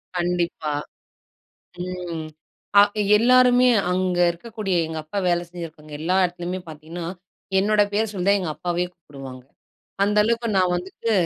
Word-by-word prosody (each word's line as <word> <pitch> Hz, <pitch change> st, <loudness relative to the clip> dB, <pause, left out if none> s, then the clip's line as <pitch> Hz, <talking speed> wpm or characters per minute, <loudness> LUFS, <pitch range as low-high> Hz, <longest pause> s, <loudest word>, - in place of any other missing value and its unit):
கண்டிப்பா. 175 Hz, -3 st, -1 dB, 1.1 s
ம் 175 Hz, -3 st, -5 dB, 0.6 s
அ -, -, +10 dB, 0.4 s
எல்லாருமே 250 Hz, +1 st, +5 dB, 0.2 s
அங்க 180 Hz, -1 st, 0 dB
இருக்கக்கூடிய 205 Hz, +1 st, -4 dB
எங்க 160 Hz, 0 st, -5 dB
அப்பா 200 Hz, +6 st, -4 dB
வேலை 175 Hz, 0 st, +2 dB
செஞ்சிருக்கவங்க 160 Hz, -3 st, -9 dB
எல்லா 180 Hz, +4 st, +1 dB
இடத்துலயுமே 180 Hz, +1 st, -3 dB
பார்த்தீங்கன்னா, 160 Hz, +2 st, -7 dB, 0.5 s
என்னோட 210 Hz, +1 st, +3 dB
பேரு 215 Hz, +1 st, 0 dB
சொல்லி 185 Hz, -1 st, -3 dB
தான் 200 Hz, 0 st, +5 dB
எங்க 175 Hz, -, -3 dB
அப்பாவயே 175 Hz, 0 st, -1 dB
கூப்பிடுவாங்க. 135 Hz, -6 st, -11 dB, 0.6 s
அந்த 210 Hz, +1 st, 0 dB
அளவுக்கு 230 Hz, 0 st, 0 dB
நான் 180 Hz, -1 st, +3 dB
வந்துட்டு 190 Hz, +5 st, -3 dB
180 Hz, 130 wpm, -23 LUFS, 170-205 Hz, 1.1 s, அ